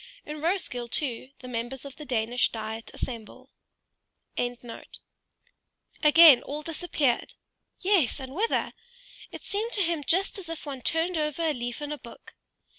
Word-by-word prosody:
In 300 Hz, 0 st, -6 dB
Roeskilde, 320 Hz, -9 st, 0 dB
too, 255 Hz, -3 st, -2 dB
the 255 Hz, -, -8 dB
members 245 Hz, +3 st, -4 dB
of 275 Hz, -2 st, -8 dB
the 300 Hz, -, -8 dB
Danish 240 Hz, -1 st, +2 dB
Diet 220 Hz, 0 st, -5 dB
assemble. 230 Hz, -4 st, -6 dB, 0.8 s
Again 245 Hz, 0 st, -1 dB
all 230 Hz, -, -9 dB, 1.1 s
suddenly 300 Hz, -2 st, +7 dB
disappeared. 305 Hz, -6 st, 0 dB, 0.5 s
Yes, 370 Hz, -, +3 dB
and 265 Hz, 0 st, -7 dB
whither? 430 Hz, +8 st, 0 dB, 0.6 s
It -, -, -9 dB
seemed 440 Hz, +4 st, -2 dB
to 405 Hz, -, +3 dB
him 330 Hz, -3 st, -1 dB
just 380 Hz, +6 st, +1 dB
as 350 Hz, -4 st, -9 dB
if 330 Hz, -1 st, -6 dB
one 275 Hz, -3 st, -5 dB
turned 325 Hz, +5 st, +1 dB
over 300 Hz, +1 st, -1 dB
a 315 Hz, -2 st, +2 dB
leaf 245 Hz, +2 st, -4 dB
in 295 Hz, -, -4 dB
a 300 Hz, -, -4 dB
book. 235 Hz, -, -13 dB
290 Hz, 150 wpm, -28 LUFS, 245-330 Hz, 1.1 s, suddenly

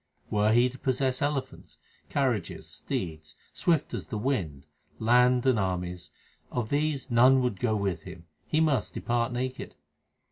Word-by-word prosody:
Were 105 Hz, 0 st, +3 dB
he 120 Hz, +2 st, +5 dB
to 130 Hz, +1 st, -9 dB
possess 130 Hz, 0 st, 0 dB
elephants, 145 Hz, -2 st, -3 dB, 0.3 s
carriages, 125 Hz, -10 st, -1 dB
steeds, 80 Hz, -3 st, -5 dB, 0.2 s
swift 165 Hz, -4 st, +1 dB
as -, -, -4 dB
the 115 Hz, -, -4 dB
wind, 95 Hz, -, -2 dB, 0.3 s
land, 125 Hz, +2 st, +4 dB
and 130 Hz, -4 st, +3 dB
armies 90 Hz, -2 st, -3 dB, 0.4 s
Of 120 Hz, -3 st, -2 dB
these 145 Hz, -2 st, -1 dB
none 130 Hz, +3 st, +6 dB
would 120 Hz, -7 st, -1 dB
go 110 Hz, -3 st, +1 dB
with 95 Hz, -5 st, -1 dB
him; 85 Hz, +2 st, -11 dB, 0.2 s
he 155 Hz, -, +1 dB
must 145 Hz, -8 st, +1 dB
depart 120 Hz, +1 st, 0 dB
naked. 130 Hz, +1 st, -4 dB
120 Hz, 145 wpm, -28 LUFS, 100-130 Hz, 0.4 s, none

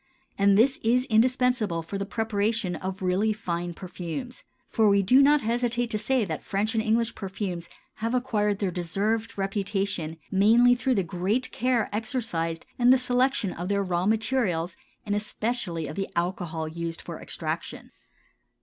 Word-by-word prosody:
And 200 Hz, 0 st, +4 dB
this 260 Hz, +5 st, +4 dB
is 245 Hz, +3 st, +3 dB
indispensable 235 Hz, -6 st, +2 dB
for 195 Hz, +4 st, -5 dB
the 200 Hz, -, -3 dB
preparation 220 Hz, -3 st, -1 dB
of 190 Hz, +3 st, -5 dB
really 195 Hz, +4 st, +2 dB
fine 175 Hz, -4 st, -4 dB
perfumes, 185 Hz, +8 st, -6 dB, 0.2 s
for 220 Hz, -2 st, +3 dB
we 200 Hz, 0 st, +4 dB
do 255 Hz, +8 st, +6 dB
not 290 Hz, +1 st, +5 dB
hesitate 240 Hz, +1 st, 0 dB
to 215 Hz, -, 0 dB
say 240 Hz, +1 st, +1 dB
that 160 Hz, -4 st, -4 dB
French 210 Hz, +3 st, -1 dB
and 225 Hz, -, +1 dB
English 230 Hz, +1 st, +1 dB
perfumes 190 Hz, -3 st, -5 dB, 0.3 s
have 230 Hz, +3 st, -1 dB
acquired 210 Hz, -5 st, +1 dB
their 195 Hz, -2 st, -1 dB
deserved 200 Hz, +7 st, -1 dB
reputation 195 Hz, -4 st, -2 dB
mainly 230 Hz, +5 st, +5 dB
through 250 Hz, +1 st, +1 dB
the 195 Hz, -, +2 dB
great 190 Hz, +9 st, -1 dB
care 245 Hz, -3 st, +1 dB
exercised 205 Hz, -8 st, -2 dB
in 245 Hz, 0 st, +5 dB
the 260 Hz, -, +8 dB
selection 250 Hz, -5 st, +1 dB
of 175 Hz, +2 st, -5 dB
their 200 Hz, 0 st, +1 dB
raw 180 Hz, 0 st, 0 dB
materials, 215 Hz, -6 st, 0 dB, 0.3 s
and 205 Hz, -, -1 dB
especially 210 Hz, -5 st, -2 dB
of 150 Hz, -, -6 dB
the 195 Hz, -, -3 dB
alcohol 170 Hz, -2 st, -2 dB
used 165 Hz, +1 st, -4 dB
for -, -, -8 dB
extraction. -, -, -5 dB
205 Hz, 160 wpm, -26 LUFS, 180-235 Hz, 0.3 s, the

